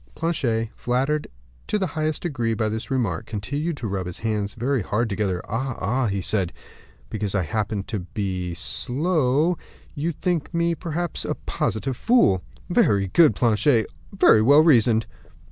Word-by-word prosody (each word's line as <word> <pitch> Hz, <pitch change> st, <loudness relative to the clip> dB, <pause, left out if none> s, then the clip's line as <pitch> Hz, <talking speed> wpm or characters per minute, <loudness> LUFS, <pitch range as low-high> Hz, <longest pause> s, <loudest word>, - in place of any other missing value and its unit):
Planchet, 120 Hz, -9 st, 0 dB
flattered 135 Hz, +5 st, 0 dB, 0.4 s
in 210 Hz, -, +2 dB
the 190 Hz, -, +1 dB
highest 155 Hz, -2 st, -2 dB
degree 120 Hz, -9 st, -1 dB
by 110 Hz, +1 st, 0 dB
this 110 Hz, +1 st, -4 dB
remark, 115 Hz, -, -1 dB
continued 145 Hz, +10 st, -3 dB
to 115 Hz, -, -4 dB
rub 95 Hz, -2 st, -3 dB
his 90 Hz, -, -7 dB
hands 105 Hz, -3 st, -2 dB
very 130 Hz, +2 st, 0 dB
hard 105 Hz, +5 st, 0 dB
together. 100 Hz, -3 st, -1 dB
"Ah, 130 Hz, +3 st, -2 dB
ah," 120 Hz, +6 st, 0 dB
he 100 Hz, -1 st, -1 dB
said, 95 Hz, -2 st, 0 dB, 0.6 s
"because 105 Hz, -2 st, -2 dB
I 95 Hz, -, +2 dB
happen 105 Hz, +3 st, -2 dB
to 105 Hz, +1 st, -4 dB
be 95 Hz, 0 st, -3 dB
only 85 Hz, -, -5 dB
slow, 145 Hz, -, 0 dB, 0.3 s
you 160 Hz, +3 st, -1 dB
think 170 Hz, 0 st, -2 dB
me, 170 Hz, 0 st, +2 dB
perhaps, 170 Hz, 0 st, -3 dB
a -, -, -2 dB
positive 125 Hz, +4 st, -2 dB
fool." 225 Hz, -, +3 dB, 0.3 s
"Very 100 Hz, -1 st, +2 dB
good, 155 Hz, -, +5 dB
Planchet; 110 Hz, +2 st, +3 dB, 0.3 s
very 190 Hz, -, +5 dB
well 140 Hz, +7 st, +7 dB
reasoned." 115 Hz, -7 st, +4 dB
115 Hz, 160 wpm, -24 LUFS, 105-150 Hz, 0.6 s, well